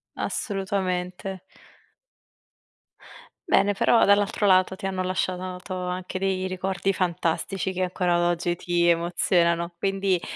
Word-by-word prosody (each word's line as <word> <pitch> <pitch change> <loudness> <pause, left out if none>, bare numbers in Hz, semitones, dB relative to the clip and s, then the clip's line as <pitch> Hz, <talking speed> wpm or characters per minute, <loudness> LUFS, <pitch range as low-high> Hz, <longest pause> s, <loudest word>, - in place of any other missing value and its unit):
Assolutamente. 190 -2 -3 2.1
Bene, 205 +1 +3
però 230 +4 +4
dall'altro 205 +1 +2
lato 185 -1 +4
ti 195 - -7
hanno 190 -1 -1
lasciato 185 0 -2
to 190 - -7
anche 180 0 -4
dei 190 -1 -1
ricordi 190 +1 -1
fantastici 180 +1 -1
che 185 - -3
ancora 175 -1 +1
oggi 175 0 -1
ti 175 0 0
emozionano. 170 0 +2
Quindi 195 -2 0
185 Hz, 110 wpm, -25 LUFS, 175-195 Hz, 2.1 s, però